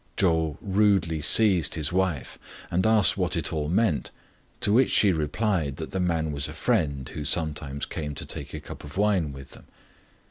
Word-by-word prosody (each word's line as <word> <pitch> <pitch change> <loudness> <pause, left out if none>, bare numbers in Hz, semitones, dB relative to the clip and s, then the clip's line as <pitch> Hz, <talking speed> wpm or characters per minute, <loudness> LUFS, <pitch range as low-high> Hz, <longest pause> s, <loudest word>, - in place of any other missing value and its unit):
Chou 80 -4 +1
rudely 95 -6 +1
seized 90 -1 +4
his 80 +1 -1
wife, 90 -7 -1 0.3
and 90 +5 +1
asked 110 -3 +4
what 90 -2 0
it 85 - -2
all 75 -1 -2
meant; 95 -4 +1 0.5
to 105 - +2
which 130 +4 +4
she 100 - +5
replied 80 -1 -1
that 80 - -6
the 95 - -2
man 80 -3 0
was 70 -1 -2
a 75 - -8
friend 80 - -1
who 75 - -6
sometimes 75 -3 -1
came 75 -2 -5
to - - -5
take - - -5
a - - -5
cup - - -10
of 75 +4 -10
wine 100 -7 +1
with 70 -1 -11
them. - - -14
80 Hz, 185 wpm, -25 LUFS, 75-95 Hz, 0.5 s, she